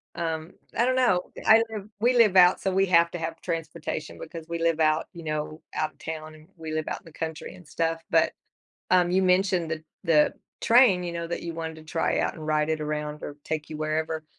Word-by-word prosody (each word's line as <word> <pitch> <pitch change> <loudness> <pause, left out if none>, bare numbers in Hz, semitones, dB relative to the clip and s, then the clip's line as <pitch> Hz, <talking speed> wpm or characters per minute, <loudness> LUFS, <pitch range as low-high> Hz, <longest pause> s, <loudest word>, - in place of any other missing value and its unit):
um, 160 0 -3 0.3
I 240 - +4
don't 255 0 +2
know, 185 -9 +3 0.2
I 225 +1 +7
live 210 -2 -6
we 245 +2 +3
live 210 -5 +5
out 180 0 +7
so 190 - -1
we 195 +1 +3
have 170 -1 +4
to 175 - -4
have 165 0 -4
transportation 165 -2 -4
because 165 0 -8
we 170 0 -3
live 165 -1 +1
out, 155 0 +3
you 170 -2 -9
know, 155 0 -4
out 155 0 -1
of - - -36
town, 155 -1 -6
and 155 0 -17
we 160 -1 -6
live 155 -1 -2
out - - -3
in - - -32
the 165 - -13
country 160 -1 -5
and 180 -3 -15
stuff, 165 +2 -1
but, - - +3 0.6
um, 180 -1 +4
you 190 - +3
mentioned 185 -2 +2
the 160 -1 -3 0.2
the 155 -3 +4 0.3
train, 225 -7 +5
you 170 - -4
know, 170 0 -4
that 170 - -4
you 170 -1 -5
wanted 160 -1 -5
to 155 - -13
try 165 +1 0
out - - -1
and 155 - -9
ride 155 0 +1
it 155 -1 -1
around 150 0 -4
or 145 - -6
take 155 -1 -4
you 155 - -5
wherever, 155 +1 -2
165 Hz, 235 wpm, -26 LUFS, 155-180 Hz, 0.6 s, I